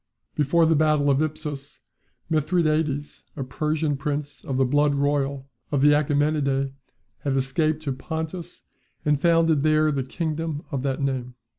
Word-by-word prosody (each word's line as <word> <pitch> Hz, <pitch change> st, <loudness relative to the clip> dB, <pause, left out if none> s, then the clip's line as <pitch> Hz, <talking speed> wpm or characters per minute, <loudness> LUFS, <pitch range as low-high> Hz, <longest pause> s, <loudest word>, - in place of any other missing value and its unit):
Before 155 Hz, +3 st, +3 dB
the 160 Hz, -, +4 dB
battle 150 Hz, -2 st, +3 dB
of 135 Hz, +2 st, +2 dB
Ipsus, 150 Hz, -2 st, -4 dB, 0.5 s
Mithridates, 155 Hz, -2 st, 0 dB
a 140 Hz, -, -3 dB
Persian 150 Hz, +3 st, -1 dB
prince 145 Hz, +1 st, -4 dB
of 135 Hz, -, -3 dB
the 135 Hz, -, +3 dB
blood 145 Hz, +2 st, +2 dB
royal 140 Hz, -1 st, 0 dB, 0.2 s
of 140 Hz, -2 st, +1 dB
the 145 Hz, -, +6 dB
Achaemenidae, 145 Hz, -2 st, +1 dB, 0.5 s
had 135 Hz, -2 st, -1 dB
escaped 155 Hz, +4 st, 0 dB
to 140 Hz, -, -2 dB
Pontus, 160 Hz, +6 st, -5 dB, 0.4 s
and 150 Hz, -2 st, +2 dB
founded 165 Hz, -3 st, +4 dB
there 155 Hz, 0 st, +3 dB
the 140 Hz, -2 st, -1 dB
kingdom 155 Hz, +2 st, -3 dB
of 135 Hz, -3 st, -2 dB
that 135 Hz, +1 st, -1 dB
name. 125 Hz, -2 st, -2 dB
145 Hz, 145 wpm, -24 LUFS, 140-155 Hz, 0.5 s, the